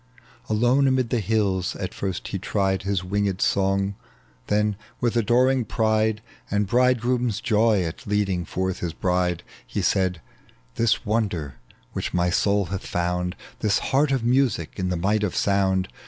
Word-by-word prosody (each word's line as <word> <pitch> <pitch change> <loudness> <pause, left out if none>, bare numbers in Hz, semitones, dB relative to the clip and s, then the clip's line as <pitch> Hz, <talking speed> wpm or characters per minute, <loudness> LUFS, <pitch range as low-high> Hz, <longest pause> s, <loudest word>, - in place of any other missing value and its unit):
Alone 120 +6 +3
amid 130 -3 +1
the 120 - +2
hills 100 -3 0
at 95 -2 -5
first 95 -2 -4
he 95 - -3
tried 95 -1 0
His 100 -1 -1
winged 100 0 -1
song; 95 0 +1 0.5
then 105 0 +1 0.2
with 120 -1 0
adoring 125 +3 +3
pride 110 -1 +1 0.3
And 105 0 +1
bridegroom's 125 -1 +2
joy 110 -4 +2
at 80 +4 -6
leading 100 -3 0
forth 95 +2 -2
his 85 -2 -3
bride, 90 -1 0 0.2
He - - -3
said, 95 -3 +1 0.3
" - - -32
This 115 -2 +1
wonder 95 - -1 0.3
which - - -3
my 90 0 +2
soul 100 +2 +2
hath 95 - -4
found, 90 +1 -1 0.2
This 105 -2 +2 0.2
heart 140 +1 +3
of 135 -3 +1
music 120 - +1
in 90 -1 -1
the 90 - -1
might 105 +5 +1
of 105 -4 -1
sound. 95 -2 +2
100 Hz, 155 wpm, -24 LUFS, 90-115 Hz, 0.5 s, Alone